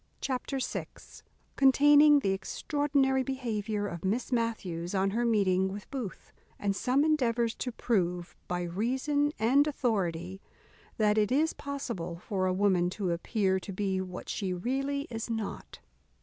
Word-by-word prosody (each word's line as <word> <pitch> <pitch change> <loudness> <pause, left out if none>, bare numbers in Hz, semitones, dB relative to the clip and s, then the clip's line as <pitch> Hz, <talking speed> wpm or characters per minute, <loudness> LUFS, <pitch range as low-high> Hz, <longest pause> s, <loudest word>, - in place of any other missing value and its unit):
Chapter 265 +1 -2
vi 260 - -3 0.7
_Containing 290 +2 +6
the 195 - +2
extraordinary 270 +6 0
behaviour 220 -5 -2
of 170 -4 -6
Miss 215 +8 -1
Matthews 200 -7 -2
on 195 +1 +2
her 235 +3 0
meeting 190 -4 +2
with 205 +1 -7
Booth, 250 -9 -6 0.2
and 200 -1 -1
some 260 +6 +2
endeavours 240 -7 +1
to 250 - -3
prove, 180 -7 -1
by 180 0 -2
reason 260 - 0
and 265 +7 +4
authority, 190 - -1 0.6
that 215 -1 +3
it 210 +2 +1
is 310 +5 +2
possible 235 - -5
for 185 +1 -2
a - - +2
woman 185 -2 +2
to 185 -1 -2
appear 190 +2 0
to 195 - -8
be 190 -1 -1
what 185 -1 -7
she 195 -3 -2
really 275 +8 -1
is 225 0 -4
not. 225 -3 -5
220 Hz, 145 wpm, -30 LUFS, 190-265 Hz, 0.7 s, Containing